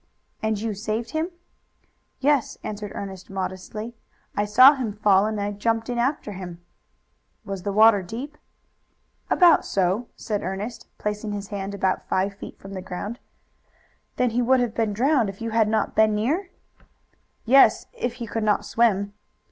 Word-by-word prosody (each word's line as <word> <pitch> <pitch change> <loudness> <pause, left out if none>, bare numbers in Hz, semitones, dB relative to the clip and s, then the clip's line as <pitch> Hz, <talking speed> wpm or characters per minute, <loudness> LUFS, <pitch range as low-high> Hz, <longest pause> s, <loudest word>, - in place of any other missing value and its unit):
"And 220 -2 0
you 220 0 -2
saved 215 +3 -3
him?" 315 +2 -1 0.9
"Yes," 285 -2 +2
answered 210 -1 -5
Ernest 190 -2 -7
modestly. 195 +4 -5 0.4
"I 205 - +1
saw 255 +7 +8
him 250 -7 -3
fall 205 -1 +3
and 205 -1 -3
jumped 225 +1 0
in 240 - -2
after 255 -3 -1
him." 180 -3 -8 0.9
"Was 195 -2 -5
the 200 +2 -2
water 215 0 +6
deep?" 245 +11 -7 0.9
"About 350 -3 +6
so 190 +1 +1
deep," 245 - -12
said 210 -2 -3
Ernest, 195 +6 -5
placing 210 0 -3
his 205 -1 -5
hand 200 -1 -4
about 190 -1 -1
five 195 +2 +1
feet 200 - -10
from 195 0 -11
the 190 - -5
ground. 205 +6 -6 1.0
"Then 250 -2 +1
he 240 +2 +1
would 260 +2 +4
have 240 -3 0
been 225 -2 0
drowned 245 +1 +2
if 195 - -9
you 230 0 -4
had 225 -1 +3
not 220 0 0
been 215 -1 +4
near?" 305 - 0 1.0
"Yes, 270 +4 +6
if 245 - -3
he 240 -1 -6
could 225 +1 -3
not 210 -1 +1
swim." 205 -3 +1
215 Hz, 165 wpm, -24 LUFS, 200-235 Hz, 1.0 s, saw